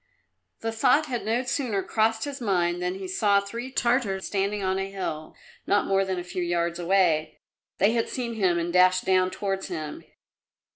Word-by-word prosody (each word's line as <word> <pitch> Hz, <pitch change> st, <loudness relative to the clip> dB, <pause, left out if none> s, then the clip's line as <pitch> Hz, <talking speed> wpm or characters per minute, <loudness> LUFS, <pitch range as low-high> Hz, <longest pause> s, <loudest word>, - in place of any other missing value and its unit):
The 225 Hz, -, -2 dB
thought 255 Hz, +7 st, +3 dB
had 245 Hz, -5 st, -3 dB
no 230 Hz, +3 st, +1 dB
sooner 250 Hz, -, -1 dB
crossed 220 Hz, 0 st, +1 dB
his 285 Hz, -2 st, -5 dB
mind 175 Hz, -5 st, 0 dB
than 180 Hz, +1 st, -1 dB
he 190 Hz, 0 st, -6 dB
saw 200 Hz, +2 st, +3 dB
three 235 Hz, +6 st, -6 dB
Tartars 235 Hz, -7 st, 0 dB
standing 200 Hz, 0 st, -1 dB
on 190 Hz, 0 st, 0 dB
a 195 Hz, 0 st, -3 dB
hill, 160 Hz, -5 st, -5 dB, 0.3 s
not 205 Hz, -, +3 dB
more 195 Hz, 0 st, +2 dB
than 190 Hz, -1 st, -2 dB
a 175 Hz, -, -3 dB
few 180 Hz, +1 st, -5 dB
yards 170 Hz, 0 st, -1 dB
away. 175 Hz, -3 st, +2 dB, 0.4 s
They 200 Hz, +4 st, +4 dB
had 230 Hz, -1 st, 0 dB
seen 240 Hz, -2 st, -3 dB
him 190 Hz, -6 st, +1 dB
and 170 Hz, 0 st, -2 dB
dashed 185 Hz, 0 st, +4 dB
down 185 Hz, -1 st, +3 dB
towards 195 Hz, 0 st, -3 dB
him. 155 Hz, -4 st, -6 dB
195 Hz, 185 wpm, -26 LUFS, 180-225 Hz, 0.4 s, They